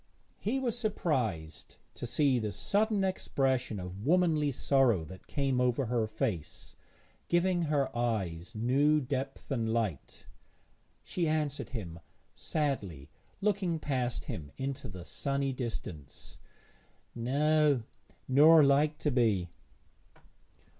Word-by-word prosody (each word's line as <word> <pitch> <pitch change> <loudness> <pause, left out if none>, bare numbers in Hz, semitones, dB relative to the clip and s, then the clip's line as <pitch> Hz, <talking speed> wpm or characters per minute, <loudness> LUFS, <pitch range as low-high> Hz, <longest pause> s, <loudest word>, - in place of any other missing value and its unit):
He 230 +6 -1
was 250 -4 -1
surprised 130 - -2 0.2
to - - -6
see 140 -4 +2
the 105 -2 -2
sudden 205 - +1
expression 130 - 0
of 90 +2 -7
womanly 160 -1 +3
sorrow 130 - +2
that 95 +4 -12
came 135 -3 0
over 125 +1 +1
her 115 -1 0
face, 110 - -4 0.5
giving 175 0 +2
her 145 -4 0
eyes 110 -5 -2
new 140 +7 +3
depth 135 +1 -4
and 115 -4 0
light. 110 -10 -3 0.8
She 175 -2 -1
answered 150 -2 -1
him 90 -9 -6 0.3
sadly, 100 - -3 0.3
looking 195 -5 +1
past 130 -6 -2
him 75 -3 -6
into 135 -1 -4
the 90 -3 -9
sunny 140 +3 -1
distance 105 - -7 0.7
'No, 145 +2 +2 0.4
nor 150 +4 +7
like 145 +2 +3
to 150 - -1
be.' 110 -9 +2
135 Hz, 115 wpm, -31 LUFS, 110-150 Hz, 0.8 s, nor